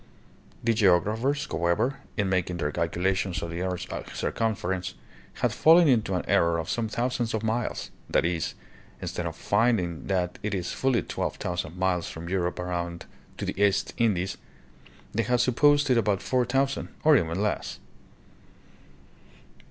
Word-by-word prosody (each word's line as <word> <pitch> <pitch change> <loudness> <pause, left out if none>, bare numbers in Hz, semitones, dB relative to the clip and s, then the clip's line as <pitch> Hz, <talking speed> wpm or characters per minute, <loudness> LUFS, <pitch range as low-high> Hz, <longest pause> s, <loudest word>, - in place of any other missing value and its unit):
The 115 0 +3
geographers, 110 - +2
however, 85 +11 +1 0.2
in 105 - +1
mak 95 -2 +1
ing 90 - -3
their 75 -3 -1
calculations 90 +2 -1
of 85 - -4
the 85 +1 -4
earth's 90 -1 -2 0.3
circumference, 95 -4 -1 0.5
had - - +3
fallen 165 +1 +6
into 110 -8 +2
an 90 - -2
error 85 0 +3
of 80 -1 -3
some 115 -2 -1
thousands 120 0 -1
of 110 - -3
miles; 110 +1 -2 0.2
that - - +2
is, 85 -2 -1 0.4
instead - - -3
of - - -5
finding 100 -6 +1
that 90 -2 -1
it 105 -1 -2
is 90 -2 -3
fully 130 -3 +1
twelve - - -3
thousand 90 -1 -4
miles 90 -2 0
from 85 +1 -7
Europe 90 -2 -1
around 85 -1 -3 0.3
to - - -3
the 100 - -3
East 100 -1 +2
Indies, 95 -5 +1 0.8
they 115 - +2
had 125 +2 +1
sup 125 -1 +1
posed 145 0 +5
it 120 - +5
about 100 -3 0
four 125 -1 +1
thousand, 135 +2 0 0.2
or 155 -1 +7
even 85 -6 +1
less. 105 +1 -1
95 Hz, 160 wpm, -27 LUFS, 90-120 Hz, 0.8 s, or